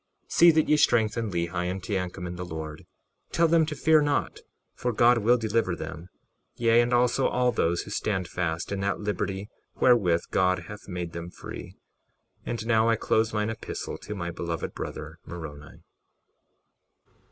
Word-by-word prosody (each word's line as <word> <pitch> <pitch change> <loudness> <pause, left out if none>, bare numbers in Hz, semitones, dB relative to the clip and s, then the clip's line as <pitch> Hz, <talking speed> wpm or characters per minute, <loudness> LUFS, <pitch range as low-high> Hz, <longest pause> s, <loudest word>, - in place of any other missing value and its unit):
61:21 - - -23
See 170 - +7
that 155 -1 +2
ye 150 - +4
strengthen 115 -4 +2
Lehi 85 0 -1
and 95 +1 -3
Teancum 90 -1 -3
in 90 0 -5
the 90 - -5
Lord; 80 -3 -7 0.4
tell 170 - +3
them 160 -1 +4
to 155 - -3
fear 160 +1 +4
not, 145 -1 0 0.3
for 125 - -2
God 120 +1 +5
will 120 +3 +4
deliver 110 -5 0
them, 85 +2 -7 0.5
yea, 115 0 +4
and 120 +1 0
also 125 +2 +3
all 125 0 +2
those 85 -6 0
who 100 - -10
stand 95 -4 -1
fast 85 0 -3
in 100 - -2
that 100 0 -1
liberty 100 -1 -3 0.3
wherewith 95 -9 +4
God 90 -2 +2
hath 105 +4 -10
made 90 -3 -4
them 85 0 -6
free. - - -9 0.7
And 115 -2 -3
now 115 -1 +3
I 115 - +4
close 110 0 +1
mine 105 0 0
epistle 110 - -6
to 105 - -7
my 85 -3 -4
beloved 85 -1 -4
brother, 80 +2 -7
Moroni. 75 -4 -9
100 Hz, 170 wpm, -27 LUFS, 85-120 Hz, 0.7 s, See